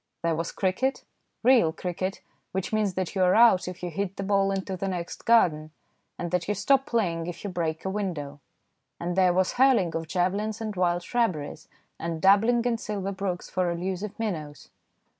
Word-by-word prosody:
There 170 0 +2
was 165 +1 -2
cricket, 205 +8 -1 0.4
real 240 -9 +5
cricket, 185 +3 -4 0.3
which 190 +3 -3
means 210 -4 +1
that 185 -2 -2
you 190 - -1
are 180 0 +4
out 230 -6 +6
if 180 -1 -7
you 175 - -3
hit 195 +3 -3
the 195 - -3
ball 195 0 +2
into 195 -1 -2
the 195 +2 -3
next 175 -2 -5
garden, 155 -10 +4 0.5
and 175 -1 -4
that 180 -1 0
you 210 - 0
stop 270 +7 +2
playing 170 -8 0
if 175 - -7
you 200 - -4
break 165 -2 -3
a - - 0
window, 160 -8 -4 0.6
and 175 +1 -3
there 185 -1 +4
was 185 +1 +2
hurling 245 -10 +3
of 165 0 -3
javelins 200 +6 -1
in 220 -2 -4
wild 175 -1 +1
shrubberies, 175 -11 -2 0.3
and 165 -1 -3
dabbling 220 +6 +4
in 235 -2 +1
silver 200 -4 -3
brooks 190 -2 -3
for 185 -1 0
elusive 185 +4 -3
minnows. 160 -10 -5
185 Hz, 185 wpm, -26 LUFS, 175-210 Hz, 0.6 s, out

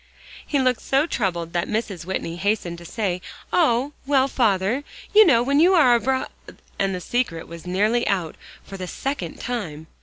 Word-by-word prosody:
He 290 - -1
looked 255 -3 +1
so 275 +3 +2
troubled 175 - -2
that 175 -1 0
Mrs. 210 -6 -3
Whitney 170 -2 -3
hastened 185 -3 -1
to 170 - -12
say, 185 -2 -2 0.3
"Oh, 280 -3 +2
well, 270 -2 +3
father! 225 0 +1 0.3
you 430 +1 +9
know 255 - +4
when 280 +3 +2
you 360 +4 +5
are 250 -8 +5
abr" 260 +2 0 0.5
and 195 -1 +1
the - - -4
secret 180 -5 -2
Was 170 +1 -10
nearly 210 +6 +1
out 180 -5 -1 0.3
for 195 - -9
the 185 -1 -5
second 275 +9 -4
time! 175 -12 -4
220 Hz, 175 wpm, -23 LUFS, 180-265 Hz, 0.5 s, you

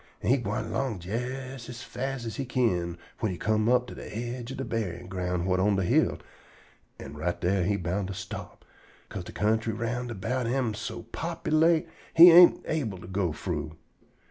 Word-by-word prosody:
An' - - +2
he 135 - +5
gwine 110 -2 -2
along 115 -4 -2
jes 125 +4 -5
as 125 0 -7
fast 135 -2 -4
as 115 - -5
he 140 - -1
kin 90 -10 0 0.2
whin 110 - 0
he 90 - -5
come 110 +2 +1
to 125 0 +2
de 105 - -8
aidge 120 +1 -5
ob 135 - -6
de 135 - -3
buryin' 90 -7 -3
ground 90 -2 -2
whut 90 0 +1
on 100 +2 +3
de 95 - +1
hill, 90 - +2 0.8
an' - - -9
right 85 +4 -2
dar 95 +2 +1
he 100 +4 +1
bound 95 +1 -2
to 100 - -5
stop, - - -8 0.4
'ca'se - - -6
de - - -8
kentry 110 +1 0
round 120 +2 -3
about 120 +3 -2
am 125 -2 0
so 115 +2 -6
populate 165 0 +1 0.3
he 170 +2 +11
ain't 175 +1 +8
able 130 -12 -2
to - - -11
go 95 -2 -1
frough. 80 -2 -4
110 Hz, 190 wpm, -28 LUFS, 95-125 Hz, 0.8 s, he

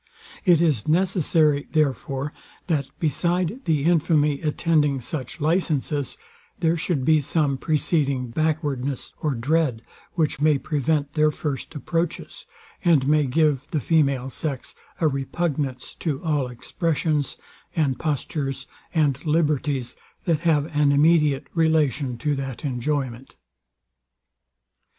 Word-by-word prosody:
It 170 -3 +5
is 145 -10 +1
necessary, 160 -4 +2
therefore, 140 -1 0 0.3
that, 150 -6 0
beside 175 - 0
the 155 -4 +1
infamy 155 -3 +2
attending 150 -3 +1
such 130 +3 -6
licences, 150 -3 0 0.4
there 165 -1 +2
should 155 -5 -1
be 155 0 +4
some 145 -1 +1
preceding 140 -3 0
backwardness 145 -3 -1
or 150 -4 0
dread, 130 -1 0 0.3
which 155 -4 0
may 150 -1 +4
prevent 145 0 -1
their 155 -1 +4
first 150 +1 -4
approaches, 165 +4 -3 0.4
and 160 -7 +4
may 150 -1 +3
give 145 0 +1
the 155 - 0
female 140 -4 +1
sex 140 -2 -4 0.3
a 160 - +3
repugnance 140 -1 -2
to 150 -5 -2
all 150 -5 0
expressions, 150 +3 -1 0.4
and 145 -5 +1
postures, 140 -2 -2 0.3
and 145 -3 +2
liberties, 150 -5 0 0.3
that 165 -5 +2
have 155 -3 +2
an 145 -1 +4
immediate 150 -1 +3
relation 155 -6 +1
to 145 +5 0
that 135 -1 -5
enjoyment. 130 -1 -3
150 Hz, 115 wpm, -24 LUFS, 135-160 Hz, 0.4 s, It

